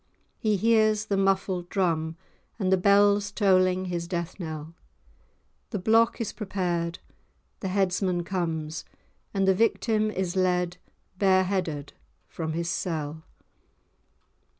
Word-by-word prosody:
He 215 Hz, -2 st, +1 dB
hears 215 Hz, 0 st, +3 dB
the 200 Hz, -, 0 dB
muffled 190 Hz, -2 st, 0 dB
drum 165 Hz, -4 st, 0 dB, 0.4 s
and 190 Hz, -3 st, +1 dB
the -, -, +5 dB
bells 200 Hz, +1 st, +4 dB
tolling 185 Hz, -2 st, +3 dB
his 175 Hz, -2 st, -3 dB
death 170 Hz, +1 st, -4 dB
knell; 160 Hz, -2 st, -6 dB, 1.0 s
the 215 Hz, -, -3 dB
block 225 Hz, +5 st, +3 dB
is 230 Hz, -, -3 dB
prepared, 175 Hz, -5 st, -2 dB, 0.6 s
the 190 Hz, -, -3 dB
headsman 185 Hz, -2 st, 0 dB
comes; 160 Hz, -4 st, -3 dB, 0.5 s
and 195 Hz, -1 st, 0 dB
the 190 Hz, -, +6 dB
victim 215 Hz, +1 st, +1 dB
is 190 Hz, -3 st, -2 dB
led 180 Hz, -1 st, +1 dB, 0.4 s
bare 190 Hz, -2 st, +4 dB
headed 170 Hz, -7 st, -2 dB, 0.3 s
from 160 Hz, -2 st, -4 dB
his 170 Hz, +1 st, -2 dB
cell. 160 Hz, -3 st, -3 dB
185 Hz, 120 wpm, -27 LUFS, 170-200 Hz, 1.0 s, the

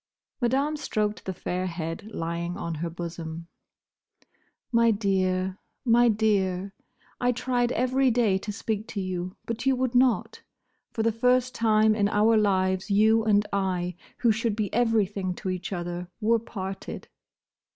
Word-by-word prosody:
Madame 270 Hz, +5 st, +1 dB
stroked 215 Hz, -7 st, -2 dB
the 190 Hz, -, -3 dB
fair 180 Hz, +2 st, -2 dB
head 165 Hz, +3 st, -5 dB
lying 170 Hz, 0 st, -3 dB
on 170 Hz, -, -4 dB
her 165 Hz, +2 st, -3 dB
bosom. 165 Hz, -1 st, -6 dB, 1.3 s
"My 230 Hz, -1 st, +4 dB
dear, 190 Hz, -3 st, 0 dB, 0.3 s
my 240 Hz, 0 st, +5 dB
dear!—I 205 Hz, +4 st, -1 dB
tried 245 Hz, 0 st, 0 dB
every 255 Hz, +2 st, +2 dB
day 220 Hz, -5 st, +2 dB
to 210 Hz, -, -5 dB
speak 215 Hz, +1 st, -3 dB
to 205 Hz, -, -5 dB
you, 185 Hz, -1 st, -3 dB
but 230 Hz, +3 st, -3 dB
you 265 Hz, -, +4 dB
would 255 Hz, -1 st, -1 dB
not. 250 Hz, -2 st, +2 dB, 0.5 s
For 220 Hz, -, -2 dB
the 230 Hz, -, +3 dB
first 250 Hz, +2 st, +2 dB
time 220 Hz, -1 st, +3 dB
in 205 Hz, -1 st, +1 dB
our 215 Hz, +2 st, +4 dB
lives 190 Hz, -2 st, +1 dB
you 220 Hz, +2 st, +4 dB
and 210 Hz, -1 st, +3 dB
I, 180 Hz, -3 st, -1 dB, 0.2 s
who 235 Hz, -, +3 dB
should 220 Hz, 0 st, 0 dB
be 210 Hz, -3 st, -2 dB
everything 205 Hz, -5 st, +1 dB
to 190 Hz, 0 st, -3 dB
each 185 Hz, +1 st, -5 dB
other, 175 Hz, -1 st, -4 dB
were 230 Hz, +1 st, +3 dB
parted." 195 Hz, -4 st, -6 dB
210 Hz, 145 wpm, -26 LUFS, 185-230 Hz, 1.3 s, my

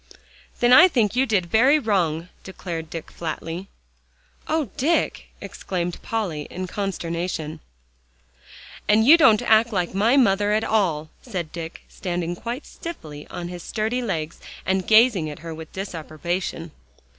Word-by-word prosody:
"Then 240 Hz, 0 st, +5 dB
I 350 Hz, +8 st, +10 dB
think 235 Hz, -, +1 dB
you 265 Hz, +2 st, +2 dB
did 200 Hz, -6 st, +2 dB
very 245 Hz, -, +4 dB
wrong," 180 Hz, -, 0 dB
declared 170 Hz, -4 st, -6 dB
Dick 165 Hz, -1 st, -7 dB
flatly. 165 Hz, +2 st, -5 dB, 0.8 s
"Oh, 310 Hz, -9 st, -1 dB
Dick!" 325 Hz, +6 st, 0 dB
exclaimed 175 Hz, -2 st, -4 dB
Polly 185 Hz, -10 st, -3 dB
in 185 Hz, +1 st, -5 dB
consternation. 170 Hz, -4 st, -3 dB, 1.3 s
"And 215 Hz, +1 st, +4 dB
you 300 Hz, +6 st, +9 dB
don't 225 Hz, -10 st, +5 dB
act 225 Hz, +2 st, +4 dB
like 180 Hz, -4 st, -1 dB
my 220 Hz, +7 st, +3 dB
mother 205 Hz, -4 st, +3 dB
at 215 Hz, +1 st, +2 dB
all," 165 Hz, -9 st, 0 dB
said 180 Hz, -10 st, -5 dB
Dick, 165 Hz, -1 st, -7 dB
standing 175 Hz, -1 st, -3 dB
quite 235 Hz, -, -5 dB
stiffly 155 Hz, -, -8 dB
on 175 Hz, 0 st, -6 dB
his 175 Hz, -1 st, -7 dB
sturdy 220 Hz, +6 st, -2 dB
legs, 165 Hz, -8 st, -3 dB, 0.3 s
and 190 Hz, -1 st, 0 dB
gazing 220 Hz, -7 st, +5 dB
at 150 Hz, -, -7 dB
her 165 Hz, -, -5 dB
with 160 Hz, 0 st, -9 dB
disapprobation. 170 Hz, -2 st, -4 dB
190 Hz, 140 wpm, -23 LUFS, 165-225 Hz, 1.3 s, I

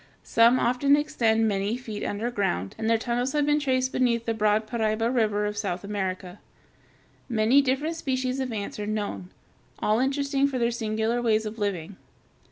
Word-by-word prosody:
Some 230 Hz, +2 st, +4 dB
often 255 Hz, +4 st, +3 dB
extend 225 Hz, -7 st, +1 dB
many 205 Hz, +2 st, -1 dB
feet 220 Hz, -4 st, -6 dB
underground, 205 Hz, -, -2 dB
and 220 Hz, 0 st, -1 dB
their 230 Hz, -, +4 dB
tunnels 245 Hz, +3 st, -2 dB
have 295 Hz, -1 st, +2 dB
been 295 Hz, 0 st, +2 dB
traced 260 Hz, -2 st, 0 dB
beneath 235 Hz, -2 st, +1 dB
the 230 Hz, -, 0 dB
broad 215 Hz, 0 st, +1 dB
Paraiba 225 Hz, 0 st, 0 dB
River 210 Hz, -4 st, +1 dB
of 210 Hz, 0 st, -3 dB
South 190 Hz, -3 st, -3 dB
America. 190 Hz, -2 st, -4 dB, 0.9 s
Many 235 Hz, +4 st, +4 dB
different 280 Hz, +5 st, -1 dB
species 260 Hz, -3 st, -2 dB
of 260 Hz, -2 st, -2 dB
ants 210 Hz, -1 st, -5 dB
are 205 Hz, -, -3 dB
known, 205 Hz, -4 st, -3 dB, 0.5 s
all 215 Hz, +2 st, +1 dB
interesting 275 Hz, +1 st, +1 dB
for 275 Hz, -2 st, -3 dB
their 235 Hz, -1 st, +1 dB
singular 220 Hz, +1 st, -1 dB
ways 220 Hz, -2 st, +1 dB
of 215 Hz, +1 st, -6 dB
living. 195 Hz, -3 st, -3 dB
225 Hz, 170 wpm, -26 LUFS, 210-255 Hz, 0.9 s, Some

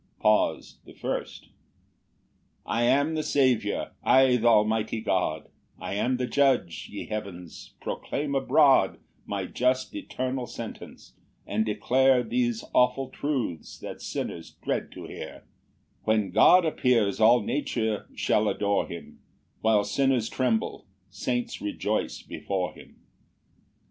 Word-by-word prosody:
PAUSE 105 Hz, 0 st, +1 dB
THE -, -, -15 dB
FIRST. -, -, -4 dB
6 -, -, -26 dB, 1.1 s
"I 120 Hz, +1 st, 0 dB
am 140 Hz, +5 st, +3 dB
the 155 Hz, -, 0 dB
Saviour, 135 Hz, -6 st, +1 dB
I 130 Hz, -1 st, +5 dB
th' 120 Hz, -1 st, -1 dB
almighty 110 Hz, 0 st, +3 dB
God, 90 Hz, -7 st, -1 dB, 0.3 s
"I -, -, -5 dB
am 125 Hz, +5 st, 0 dB
the 125 Hz, -, -1 dB
Judge: 130 Hz, -, +1 dB
ye 105 Hz, -, -6 dB
heavens, 100 Hz, -5 st, -7 dB
proclaim 140 Hz, 0 st, -3 dB
abroad 135 Hz, +1 st, +4 dB, 0.3 s
"My -, -, -3 dB
just 130 Hz, -, 0 dB
eternal 130 Hz, -, -4 dB
sentence, 115 Hz, -1 st, -9 dB, 0.3 s
and 105 Hz, +2 st, 0 dB
declare 125 Hz, +4 st, +3 dB
"Those 120 Hz, 0 st, -1 dB
awful 130 Hz, +1 st, +2 dB
truths 125 Hz, -, -3 dB
that -, -, -8 dB
sinners 85 Hz, -1 st, -5 dB
dread -, -, -2 dB
to -, -, -9 dB
hear," -, -, -9 dB, 0.6 s
When 110 Hz, -3 st, +1 dB
God 170 Hz, -, +6 dB
appears 120 Hz, -9 st, +1 dB
all 115 Hz, +2 st, +6 dB
nature 110 Hz, -5 st, -2 dB
shall 105 Hz, 0 st, +2 dB
adore 100 Hz, -1 st, 0 dB
him; 85 Hz, -1 st, -10 dB, 0.4 s
While 110 Hz, -2 st, +3 dB
sinners 130 Hz, -2 st, +1 dB
tremble, 125 Hz, -4 st, -1 dB, 0.2 s
saints 120 Hz, +4 st, -3 dB
rejoice 105 Hz, 0 st, -2 dB
before 95 Hz, -2 st, -3 dB
him. -, -, -15 dB
120 Hz, 125 wpm, -27 LUFS, 105-130 Hz, 1.1 s, God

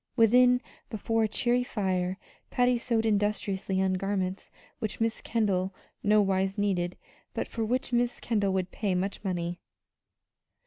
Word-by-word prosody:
Within, 250 Hz, +2 st, +5 dB, 0.3 s
before 225 Hz, +1 st, 0 dB
a -, -, +1 dB
cheery 245 Hz, +3 st, +1 dB
fire, 185 Hz, -5 st, -1 dB, 0.3 s
Patty 245 Hz, -1 st, +2 dB
sewed 230 Hz, -2 st, 0 dB
industriously 205 Hz, -2 st, 0 dB
on 190 Hz, -1 st, +2 dB
garments 190 Hz, 0 st, -2 dB, 0.3 s
which 215 Hz, -, -3 dB
Miss 225 Hz, 0 st, 0 dB
Kendall 195 Hz, -4 st, 0 dB, 0.3 s
no 210 Hz, 0 st, +4 dB
wise 195 Hz, +1 st, 0 dB
needed, 180 Hz, -4 st, 0 dB, 0.4 s
but -, -, -2 dB
for 225 Hz, -, -3 dB
which 250 Hz, +3 st, -1 dB
Miss 240 Hz, 0 st, +1 dB
Kendall 205 Hz, -4 st, 0 dB
would 185 Hz, -1 st, -1 dB
pay 200 Hz, -4 st, -1 dB
much 195 Hz, +3 st, -2 dB
money. 175 Hz, -2 st, -2 dB
205 Hz, 140 wpm, -29 LUFS, 190-225 Hz, 0.4 s, Within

